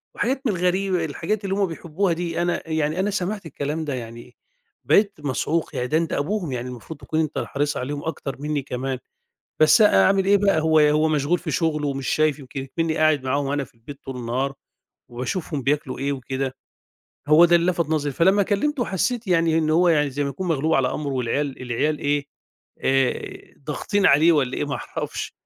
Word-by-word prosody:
وحاجات 265 Hz, +2 st, 0 dB
من -, -, +2 dB
الغريبة، 180 Hz, 0 st, 0 dB
الحاجات 170 Hz, +8 st, -3 dB
اللي 195 Hz, -1 st, -1 dB
هُم 200 Hz, 0 st, +2 dB
بيحبّوها 170 Hz, +2 st, -1 dB
دي." 170 Hz, 0 st, -2 dB
أنا 175 Hz, -1 st, -2 dB
يعني، 155 Hz, +1 st, 0 dB
أنا 195 Hz, +2 st, +1 dB
سمَعت 195 Hz, 0 st, -3 dB
الكلام 150 Hz, +1 st, -3 dB
ده 145 Hz, -, -3 dB
يعني 120 Hz, -2 st, -8 dB, 0.5 s
بقيت 200 Hz, -4 st, +3 dB
مصعوق، 150 Hz, +3 st, -2 dB
يعني 125 Hz, -, -1 dB
ده 155 Hz, -, +2 dB
أنت 165 Hz, -1 st, -1 dB
أبوهم، 170 Hz, +1 st, -1 dB
يعني 125 Hz, -1 st, -3 dB
المفروض 125 Hz, +5 st, -9 dB
تكُون 155 Hz, +4 st, -2 dB
أنت 155 Hz, -2 st, -1 dB
الحريص 145 Hz, +1 st, -1 dB
عليهم 145 Hz, +3 st, -4 dB
أكتر 145 Hz, -4 st, -4 dB
منّي 150 Hz, 0 st, -2 dB
كمان، 130 Hz, 0 st, -3 dB, 0.6 s
بس 155 Hz, +8 st, +6 dB
أ 205 Hz, -, +6 dB
أعمِل 195 Hz, -1 st, +3 dB
إيه 200 Hz, +1 st, +6 dB
بقى، 200 Hz, -4 st, +2 dB
هو 160 Hz, 0 st, +4 dB
هو 150 Hz, +1 st, +4 dB
مشغول 155 Hz, +3 st, +1 dB
في 165 Hz, -1 st, -5 dB
شُغله 150 Hz, -1 st, 0 dB
ومش 135 Hz, -1 st, -3 dB
شايف، 155 Hz, -1 st, +2 dB
يمكن 135 Hz, -1 st, -7 dB
إكمنّي 160 Hz, +4 st, -2 dB
قاعد 155 Hz, -4 st, +3 dB
معاهم 140 Hz, +2 st, 0 dB
أنا 140 Hz, -1 st, -1 dB
في -, -, -23 dB
البيت 115 Hz, +5 st, -11 dB
طُول 135 Hz, -, -6 dB
النهار 125 Hz, +3 st, -2 dB, 0.6 s
وباشوفهم 140 Hz, +4 st, -3 dB
بياكلوا 140 Hz, 0 st, -1 dB
إيه 140 Hz, +1 st, -1 dB
وكده، 130 Hz, 0 st, -3 dB, 0.8 s
هو 155 Hz, +3 st, +8 dB
ده 175 Hz, 0 st, +4 dB
اللي 170 Hz, +2 st, +2 dB
لَفَت 170 Hz, -2 st, -1 dB
نظري، 150 Hz, -2 st, 0 dB
فلما 190 Hz, +7 st, +4 dB
كلّمته 240 Hz, +7 st, 0 dB
حسّيت 225 Hz, +4 st, -1 dB
يعني 165 Hz, -3 st, +3 dB
إن 155 Hz, -1 st, +1 dB
هو 175 Hz, +2 st, +4 dB
يعني 150 Hz, -3 st, +3 dB
زي 140 Hz, +2 st, -2 dB
ما 140 Hz, -, -1 dB
يكُون 160 Hz, +7 st, -5 dB
مغلوب 160 Hz, 0 st, +1 dB
على 130 Hz, -1 st, +2 dB
أمره 145 Hz, -2 st, -3 dB
والعيال 130 Hz, +3 st, -2 dB
العيال 130 Hz, +5 st, -1 dB
إيه، 145 Hz, 0 st, 0 dB, 0.5 s
آآ 135 Hz, -1 st, -1 dB
ضاغطين 170 Hz, +8 st, -1 dB
عليه 155 Hz, +5 st, +6 dB
والّا 135 Hz, -5 st, +1 dB
إيه -, -, -1 dB
ما 145 Hz, -, -3 dB
أعرَفش -, -, -5 dB
155 Hz, 195 wpm, -23 LUFS, 140-175 Hz, 0.8 s, هو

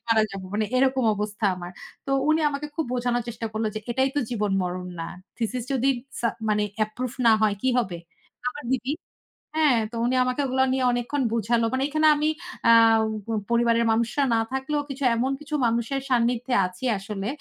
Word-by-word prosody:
মারা 225 Hz, -1 st, +4 dB
যাবো। 195 Hz, -1 st, -7 dB
মানে 215 Hz, +1 st, +1 dB
এরকম 260 Hz, 0 st, +2 dB
অবস্থা 210 Hz, +1 st, -4 dB
আমার। 175 Hz, -1 st, -7 dB, 0.4 s
তো -, -, -3 dB, 0.2 s
উনি 310 Hz, +1 st, +4 dB
আমাকে 290 Hz, +1 st, -4 dB
খুব 320 Hz, -, -1 dB
বোঝানোর 245 Hz, -1 st, 0 dB
চেষ্টা 230 Hz, 0 st, -4 dB
করল 220 Hz, +1 st, -2 dB
যে 215 Hz, -, -3 dB
এটাই 265 Hz, +3 st, +2 dB
তো -, -, +3 dB
জীবন 210 Hz, -4 st, -1 dB
মরণ 180 Hz, 0 st, -3 dB
না। 165 Hz, -, -3 dB, 0.3 s
থিসিস 240 Hz, +1 st, -2 dB
যদি 265 Hz, 0 st, +1 dB, 0.3 s
সা 235 Hz, -, +2 dB, 0.2 s
মানে 210 Hz, 0 st, +2 dB, 0.2 s
অ্যাপ্রুভ 220 Hz, +3 st, -2 dB
না 230 Hz, -, +8 dB
হয় 210 Hz, -2 st, +3 dB
কি 260 Hz, -, +2 dB
হবে? 185 Hz, -8 st, -1 dB, 0.5 s
আমার 270 Hz, +3 st, -7 dB
দিদি 260 Hz, 0 st, -1 dB, 0.7 s
হ্যাঁ, 300 Hz, -6 st, +4 dB
তো -, -, -8 dB
উনি 250 Hz, +2 st, +1 dB
আমাকে 255 Hz, +2 st, -1 dB
ওগুলা 260 Hz, 0 st, +2 dB
নিয়ে 260 Hz, 0 st, +1 dB
অনেকক্ষণ 245 Hz, +4 st, -1 dB
বুঝালো। 230 Hz, +1 st, +1 dB
মানে 260 Hz, +1 st, +1 dB
এখানে 310 Hz, +1 st, +3 dB
আমি 300 Hz, +1 st, 0 dB, 0.4 s
আ -, -, +8 dB, 0.8 s
পরিবারের 235 Hz, 0 st, +3 dB
মানুষরা 235 Hz, +5 st, +1 dB
না -, -, +3 dB
থাকলেও 270 Hz, +3 st, -1 dB, 0.3 s
এমন 255 Hz, +4 st, 0 dB
কিছু 300 Hz, 0 st, -5 dB
মানুষের 235 Hz, +4 st, 0 dB
সান্নিধ্যে 245 Hz, 0 st, +1 dB
আছি 180 Hz, +5 st, -8 dB
আসলে। 195 Hz, 0 st, -5 dB
240 Hz, 180 wpm, -25 LUFS, 220-265 Hz, 0.8 s, না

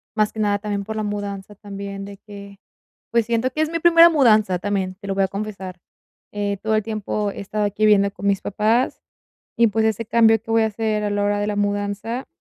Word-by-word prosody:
más 215 Hz, -1 st, +1 dB
que 220 Hz, -, -8 dB
nada 205 Hz, -1 st, +1 dB
también 205 Hz, -1 st, -3 dB
por 220 Hz, +2 st, -6 dB
la 215 Hz, -, -2 dB
mudanza 205 Hz, -1 st, -5 dB
también 200 Hz, -1 st, -7 dB
de 200 Hz, 0 st, -10 dB
que, 200 Hz, -1 st, -12 dB, 0.5 s
pues, 235 Hz, -1 st, +2 dB
siento 235 Hz, +3 st, 0 dB
que 310 Hz, -, -2 dB
es 315 Hz, -, 0 dB
mi 335 Hz, -, -1 dB
primera 335 Hz, 0 st, +7 dB
mudanza, 215 Hz, -, +3 dB
también, 190 Hz, -1 st, -2 dB
te 200 Hz, -, -8 dB
lo 195 Hz, -, -2 dB
voy 195 Hz, -, +2 dB
a -, -, -6 dB
confesar. 195 Hz, -3 st, -6 dB, 0.5 s
Eh, 205 Hz, -1 st, -2 dB
todo 220 Hz, 0 st, +1 dB
el 215 Hz, -, +1 dB
tiempo 210 Hz, -1 st, -3 dB
he -, -, -9 dB
estado 210 Hz, +1 st, -2 dB
aquí 205 Hz, +1 st, -2 dB
viviendo 200 Hz, -2 st, +4 dB
con 200 Hz, -, -5 dB
mis 200 Hz, -1 st, +1 dB
papás 220 Hz, +5 st, 0 dB, 0.6 s
y, 235 Hz, -, +5 dB
pues, 220 Hz, +1 st, 0 dB
ese 220 Hz, +1 st, -1 dB
cambio 225 Hz, 0 st, +4 dB
que 225 Hz, -, -18 dB
voy 225 Hz, 0 st, +3 dB
a -, -, +2 dB
hacer 215 Hz, 0 st, -2 dB
a 205 Hz, -, 0 dB
la 205 Hz, 0 st, 0 dB
hora 205 Hz, 0 st, 0 dB
de 205 Hz, -, -1 dB
la 210 Hz, -, -2 dB
mudanza, 205 Hz, +4 st, -2 dB
210 Hz, 230 wpm, -21 LUFS, 200-220 Hz, 0.6 s, primera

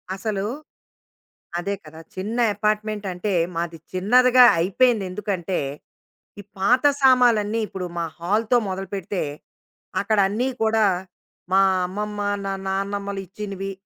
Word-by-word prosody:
అసలు 195 Hz, 0 st, -3 dB, 1.1 s
అదే 200 Hz, +3 st, -2 dB
కదా! 160 Hz, +1 st, -12 dB, 0.2 s
చిన్న 205 Hz, +5 st, -4 dB, 0.2 s
అపార్ట్‌మెంట్ 215 Hz, 0 st, -1 dB
అంటే, 190 Hz, +3 st, -2 dB, 0.2 s
మాది 170 Hz, 0 st, -3 dB
చిన్నదిగా 250 Hz, +7 st, +5 dB
అయిపోయింది. 205 Hz, +4 st, +2 dB
ఎందుకంటే 190 Hz, -2 st, -2 dB, 0.8 s
ఈ -, -, -16 dB, 0.2 s
పాత 250 Hz, +8 st, +3 dB, 0.2 s
సామాన్లన్నీ 235 Hz, -5 st, +4 dB
ఇప్పుడు 190 Hz, -2 st, -5 dB
మా 170 Hz, -, 0 dB
హాల్‌తో 215 Hz, +7 st, +2 dB
మొదలుపెడితే 190 Hz, 0 st, -3 dB, 0.8 s
అక్కడ 215 Hz, -, 0 dB
అన్నీ 240 Hz, +6 st, 0 dB
కూడా 220 Hz, 0 st, +3 dB, 0.7 s
మా 195 Hz, -, +6 dB, 0.3 s
అమ్మమ్మ, 210 Hz, +2 st, -4 dB, 0.5 s
నాన్నమ్మలు 200 Hz, +1 st, -2 dB
ఇచ్చినవి. 195 Hz, 0 st, -6 dB
205 Hz, 105 wpm, -23 LUFS, 190-220 Hz, 1.1 s, మా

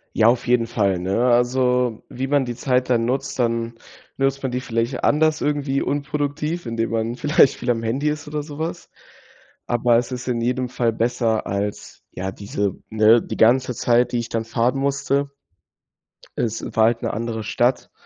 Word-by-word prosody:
Ja, 110 Hz, -, +5 dB
auf 120 Hz, +1 st, +2 dB
jeden 120 Hz, -2 st, +2 dB
Fall, 100 Hz, -5 st, 0 dB
ne? 95 Hz, +7 st, 0 dB
Also, 125 Hz, -1 st, +2 dB
wie 130 Hz, +2 st, -4 dB
man 140 Hz, -1 st, +2 dB
die 120 Hz, -, -4 dB
Zeit 125 Hz, 0 st, 0 dB
dann 115 Hz, -2 st, +3 dB
nutzt 130 Hz, +2 st, -2 dB
dann 115 Hz, -1 st, 0 dB, 0.4 s
nutzt 135 Hz, 0 st, 0 dB
man 130 Hz, -, -1 dB
die 125 Hz, +1 st, -2 dB
vielleicht 120 Hz, +1 st, -2 dB
anders 155 Hz, +1 st, +2 dB
irgendwie 145 Hz, -2 st, 0 dB
unproduktiv, 145 Hz, +2 st, -2 dB
indem 115 Hz, 0 st, -2 dB
man 115 Hz, +1 st, -1 dB
vielleicht 150 Hz, 0 st, +4 dB
viel 125 Hz, 0 st, -1 dB
am 115 Hz, -, -1 dB
Handy 130 Hz, +7 st, 0 dB
ist 150 Hz, 0 st, -4 dB
oder 150 Hz, 0 st, -3 dB
so 145 Hz, 0 st, -10 dB
was, 165 Hz, +2 st, -5 dB, 0.8 s
aber 120 Hz, 0 st, +3 dB
es 120 Hz, +2 st, -1 dB
ist 125 Hz, 0 st, -5 dB
in 120 Hz, -2 st, 0 dB
jedem 125 Hz, +1 st, -1 dB
Fall 120 Hz, -2 st, 0 dB
besser 115 Hz, -1 st, 0 dB
als, 100 Hz, +1 st, -4 dB
ja, 95 Hz, +1 st, -4 dB
diese 100 Hz, 0 st, -3 dB
ne, 110 Hz, +1 st, +5 dB
die -, -, -6 dB
ganze 125 Hz, +3 st, +4 dB
Zeit, 120 Hz, +2 st, +2 dB
die 120 Hz, -, +1 dB
ich 120 Hz, -, -5 dB
dann 115 Hz, -1 st, -2 dB
fahren 120 Hz, +3 st, 0 dB
musste. 140 Hz, 0 st, 0 dB, 1.1 s
Es 115 Hz, -2 st, -2 dB
war 110 Hz, -, +5 dB
halt 115 Hz, 0 st, +1 dB
'ne -, -, -1 dB
andere 115 Hz, 0 st, -3 dB
Stadt. 120 Hz, +4 st, 0 dB
120 Hz, 185 wpm, -22 LUFS, 115-135 Hz, 1.1 s, Ja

